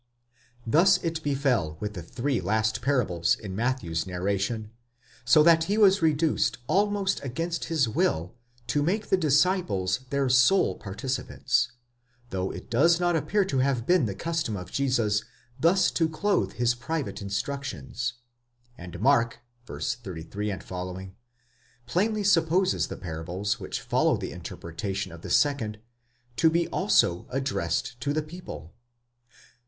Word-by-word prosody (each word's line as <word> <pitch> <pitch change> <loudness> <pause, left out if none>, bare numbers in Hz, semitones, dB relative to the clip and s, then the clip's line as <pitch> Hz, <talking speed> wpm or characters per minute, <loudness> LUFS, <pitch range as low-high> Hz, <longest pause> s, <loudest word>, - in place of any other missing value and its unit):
Thus 175 - +5
it 165 -1 -2
befel 130 - 0
with 105 0 -4
the 90 - -6
three 120 - -2
last 110 +4 0
parables 115 - +1
in 100 -4 -7
Matthew's 110 -8 -1
natration; 100 +4 -2 0.5
so 155 +5 +6
that 165 0 +5
he 205 +2 0
was 195 -3 +5
reduced 160 0 +2
almost 195 +4 +1
against 165 +6 -3
his 155 -6 +1
will 90 -5 0 0.3
to 135 +5 0
make 200 +8 -1
the - - +5
disciples 145 - +2
their 140 -1 +1
sole 130 +9 +4
participants, 125 +3 -2 0.6
though 95 0 -2
it - - -8
does 165 +8 +4
not 175 -1 +2
appear 200 +6 +1
to 135 -8 -1
have 130 -3 +1
been 175 -7 +3
the 100 - -4
custom 165 -5 -2
of 90 -1 -8
Jesus 120 -6 +1 0.4
thus 175 +6 +4
to 165 -2 +1
clothe 200 +6 0
his 120 0 +1
private 135 +2 -4
instructions; 120 - -4 0.6
and 90 -1 -8
Mark 120 -2 +3 0.3
(v. - - -7
33 105 -2 -4
f) 95 - -8 1.1
plainly 210 - 0
supposes 180 0 +2
the - - -7
parables 90 +4 -3
which - - -4
follow - - +2
the - - -5
interpretation 95 +3 -5
of 85 0 -11
the - - -8
second, 125 -8 +1 0.6
to 165 - +5
be 170 +1 +1
also 105 -5 +2
addressed 125 -4 -2
to 145 +3 -1
the 155 0 0
people." 150 - -9
130 Hz, 135 wpm, -27 LUFS, 100-165 Hz, 1.1 s, so